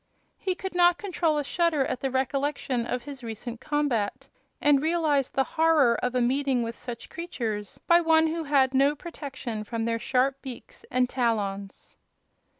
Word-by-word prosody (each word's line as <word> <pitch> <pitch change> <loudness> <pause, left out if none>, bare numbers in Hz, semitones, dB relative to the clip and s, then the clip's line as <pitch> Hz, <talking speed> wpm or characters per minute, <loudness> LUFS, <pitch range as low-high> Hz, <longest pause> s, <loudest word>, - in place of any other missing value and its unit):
He 375 -1 -1
could 380 0 -6
not 350 0 +5
control 340 -6 0
a 295 - 0
shudder 315 -2 +1
at 255 - -3
the 270 - -1
recollection 265 -2 -1
of 250 -1 -2
his 275 -3 -9
recent 230 +1 -6
combat, 285 -9 -1 0.3
and 290 -2 +4
realized 310 -4 +1
the 270 - +3
horror 315 -5 +3
of 250 0 -1
a 250 - +2
meeting 260 0 +1
with 230 0 -4
such 240 -2 -8
creatures 225 - -5
by 340 0 +5
one 320 -1 +4
who 320 0 -2
had 275 -2 +3
no 275 +2 +4
protection 270 -9 -6
from 225 +1 -3
their 230 0 0
sharp 265 +3 +1
beaks 255 -3 -10
and 250 0 +2
talons. 205 -6 -2
270 Hz, 165 wpm, -27 LUFS, 240-315 Hz, 0.3 s, not